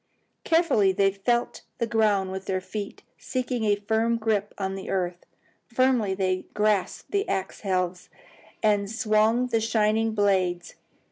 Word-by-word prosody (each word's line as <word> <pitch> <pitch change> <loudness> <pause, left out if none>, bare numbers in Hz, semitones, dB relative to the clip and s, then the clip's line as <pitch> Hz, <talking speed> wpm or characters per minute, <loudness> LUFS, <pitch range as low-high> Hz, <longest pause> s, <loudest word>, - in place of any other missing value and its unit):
Carefully 325 - +3
they 195 +1 +3
felt 235 +5 -1 0.2
the 235 - 0
ground 210 -4 +1
with 190 0 -6
their 190 -1 -1
feet, 200 +2 -7 0.2
seeking 250 -3 -2
a 205 -1 +3
firm 220 +3 0
grip 215 -2 0
of 190 -1 -2
the 190 - -7
earth. 180 -2 -2 0.4
Firmly 245 -5 +2
they 185 -1 -1
grasped 210 -2 0
the 400 +1 0
axe 190 - -2
helves 185 -2 -2 0.5
and 205 -2 +2
swung 220 +1 +2
the 225 -2 +1
shining 220 0 +1
blades. 185 -4 +1
210 Hz, 140 wpm, -26 LUFS, 190-225 Hz, 0.5 s, Carefully